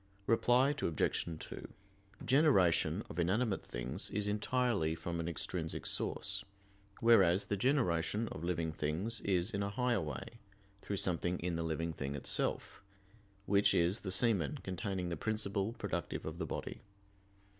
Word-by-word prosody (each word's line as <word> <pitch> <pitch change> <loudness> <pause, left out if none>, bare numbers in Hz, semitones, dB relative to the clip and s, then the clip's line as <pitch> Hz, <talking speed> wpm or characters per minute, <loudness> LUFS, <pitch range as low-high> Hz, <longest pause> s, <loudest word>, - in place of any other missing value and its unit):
Reply 125 +4 +4
Obj. 80 -3 0
2: - - -8 0.6
Generation 130 - +4
of 85 - -6
inanimate 100 +5 +1
things - - -3
is 105 0 -1
entirely 105 -5 +1
from 85 0 -4
an 85 - -2
extrinsic 85 - -3
source; - - -1 0.6
whereas 100 -6 +5
the 105 - -1
generation 110 - +1
of 80 - -7
living 85 -2 -1
things 80 +9 -2
is 95 +1 +1
in 100 -2 -1
a 100 - -1
higher 120 0 +1
way, 80 - -6 0.4
through 100 - -3
something 90 -1 +1
in 90 0 -2
the 85 - -1
living 80 +1 -2
thing 70 -2 -4
itself, 70 - -2 0.6
which 100 0 +4
is 85 +5 +3
the 95 - -4
semen 95 - +2
containing 95 -1 -3
the 85 - -3
principle 105 +1 -1
productive - - -3
of 80 +2 -5
the 80 - -2
body. - - -5
95 Hz, 145 wpm, -35 LUFS, 85-110 Hz, 0.6 s, whereas